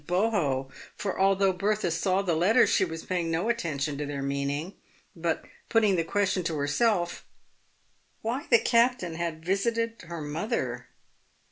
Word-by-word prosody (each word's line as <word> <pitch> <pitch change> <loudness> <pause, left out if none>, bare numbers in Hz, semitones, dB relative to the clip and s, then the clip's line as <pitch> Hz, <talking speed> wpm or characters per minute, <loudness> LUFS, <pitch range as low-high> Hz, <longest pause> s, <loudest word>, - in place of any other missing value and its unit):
oho; 175 -9 +1 0.3
for 195 - -3
although 195 0 +3
Bertha 205 0 0
saw 185 +4 +1
the 180 -3 +1
letters 200 +10 +4
she - - +3
was 165 -3 -4
paying 175 -3 -1
no 165 +7 0
attention 150 -10 -1
to 150 - -2
their 140 -1 -4
meaning, 140 +5 -2 0.4
but 165 -1 -2 0.2
putting 215 -4 +4
the 165 - +1
question 195 +2 0
to 165 -2 -1
herself, 175 +5 +1 1.0
why 245 +6 -2
the 235 - +8
captain 235 -6 +2
had 160 -1 -4
visited 230 +4 0
her 170 -1 -6
mother 145 - -3
180 Hz, 145 wpm, -28 LUFS, 160-210 Hz, 1.0 s, the